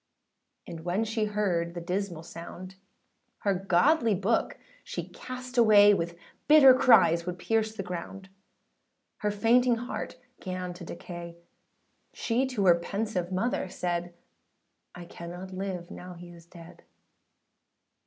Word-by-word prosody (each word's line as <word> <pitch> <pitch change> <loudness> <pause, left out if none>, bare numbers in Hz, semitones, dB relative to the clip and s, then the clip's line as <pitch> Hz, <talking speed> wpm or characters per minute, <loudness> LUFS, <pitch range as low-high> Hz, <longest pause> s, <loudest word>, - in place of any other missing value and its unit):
And 165 - -8
when 175 +6 -1
she 220 -1 -1
heard 185 -5 -1
the - - -3
dismal 180 -1 -3
sound, 175 +3 -9 0.7
Her 200 - +1
godly 205 - +3
book 200 +5 0 0.3
she - - -6
cast 255 0 -5
away, 205 -2 +7
With 170 -2 -2 0.3
bitter 295 -4 +9
cries 170 -10 +5
would 180 0 -3
pierce 220 +3 0
the 195 - -4
ground. 180 +2 -7 0.9
Her 210 - -1
fainting 235 +4 +3
heart 245 +2 -6 0.2
âgan 185 -1 -4
to 175 0 -11
decay: 170 0 -8 0.8
She 250 +3 0
to 235 -7 -1
her 170 -2 +6
pensive 195 -1 -3
mother 190 0 -1
said, 175 -1 -3 0.8
âI 175 -1 -9
cannot 175 +3 -9
live 185 -1 -5
now 180 0 -9
he 175 0 -11
is 170 -1 -15
dead. 170 -1 -14
185 Hz, 130 wpm, -28 LUFS, 175-220 Hz, 0.9 s, bitter